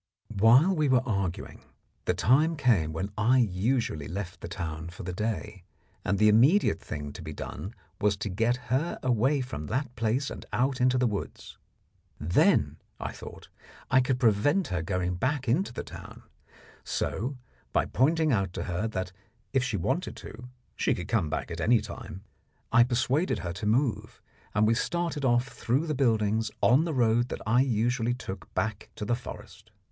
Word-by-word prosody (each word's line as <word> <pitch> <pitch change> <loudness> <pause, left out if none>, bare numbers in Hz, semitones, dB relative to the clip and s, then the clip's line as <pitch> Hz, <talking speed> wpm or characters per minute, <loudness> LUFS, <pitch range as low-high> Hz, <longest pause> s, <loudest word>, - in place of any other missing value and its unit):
While 125 - +6
we 155 -3 +1
were 130 -1 +4
arguing, 100 -6 -3 0.4
the - - +1
time 150 - +3
came 110 - +2
when 95 +6 -4
I 120 +5 +4
usually 110 - 0
left 90 -1 -6
the - - -5
town 80 -1 -5
for 85 - -9
the 90 0 -4
day, 105 -1 -3 0.4
and 100 - 0
the 105 - +5
immediate 120 - +4
thing 75 -1 -6
to - - -9
be 80 -1 -6
done 100 +8 -7 0.2
was 105 -1 +2
to 105 - -4
get 115 +6 +1 0.2
her 150 +7 0
away 130 +3 +2
from 120 - -5
that 125 0 -2
place 115 +4 0
and - - -7
out 130 +1 0
into 130 0 +4
the 125 - +2
woods. 105 -4 -5 0.6
Then, 75 -2 +3 0.2
I - - -4
thought, - - -11 0.4
I 130 0 +6
could 125 0 0
prevent 130 - +2
her 90 -1 -1
going 90 0 -1
back 130 +5 -1
into 140 +10 +1
the 120 - -5
town; - - -11 0.6
so 125 +6 -2 0.3
by - - +2
pointing 155 +4 +2
out 95 -6 0
to - - -3
her 90 +5 -2
that, 95 -4 -4 0.4
if 135 -1 +3
she 120 -6 -1
wanted 85 - -1
to, 120 +3 -10 0.3
she - - +1
could - - -6
come 80 - +1
back 75 0 -3
at 85 0 -4
any 120 +4 +4
time, 95 -1 -8 0.5
I 120 - +7
persuaded 130 +7 +1
her 85 - -3
to 95 +4 -4
move, 120 +2 0 0.4
and 105 0 +4
we 110 - +4
started 165 +3 -1
off 120 0 +2
through 135 +6 -1
the 155 - -1
buildings 110 -5 +1
on 135 +7 +4
the 165 - -2
road 120 0 +2
that - - -5
I 115 +3 +4
usually 120 -1 +1
took 95 -6 -8
back 110 -2 -2
to 105 - -5
the 120 - 0
forest. 125 - -10
115 Hz, 180 wpm, -28 LUFS, 95-130 Hz, 0.6 s, I